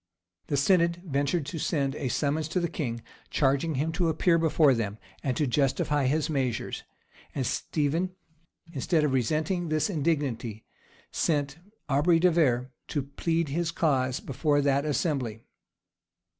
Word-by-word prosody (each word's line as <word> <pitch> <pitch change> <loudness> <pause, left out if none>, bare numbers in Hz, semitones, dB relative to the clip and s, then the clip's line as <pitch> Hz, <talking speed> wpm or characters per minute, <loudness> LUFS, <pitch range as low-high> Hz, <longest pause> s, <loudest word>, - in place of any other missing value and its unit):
[] 90 0 -49
The 145 - 0
synod, 170 +3 +3
ventured 145 +1 0
to 155 +3 -5
send 140 -3 0
a 140 -2 -3
summons 150 +4 0
to 180 - -1
the 170 - 0
king, 120 -8 -4 0.3
charging 140 +3 +1
him 150 +5 0
to 165 0 +1
appear 165 +2 +3
before 155 -3 +4
them, 110 -3 -2 0.2
and 130 -3 -1
to 150 - +2
justify 140 +1 +1
his 150 +3 +1
measures;[] 130 -7 -2 0.5
and 135 - -1
Stephen, 165 +8 -1 0.6
instead 155 +3 +1
of 145 -3 +1
resenting 155 - 0
this 155 +6 +1
indignity, 140 - -1 0.5
sent 145 -1 0 0.3
Aubrey 150 +5 +4
de 180 +2 +4
Vere 130 -6 +2 0.2
to 145 -3 -2
plead 165 +3 -1
his 165 +4 -1
cause 130 -6 +1
before 145 +2 0
that 140 0 +2
assembly. 135 -7 -1
145 Hz, 145 wpm, -28 LUFS, 135-160 Hz, 0.6 s, before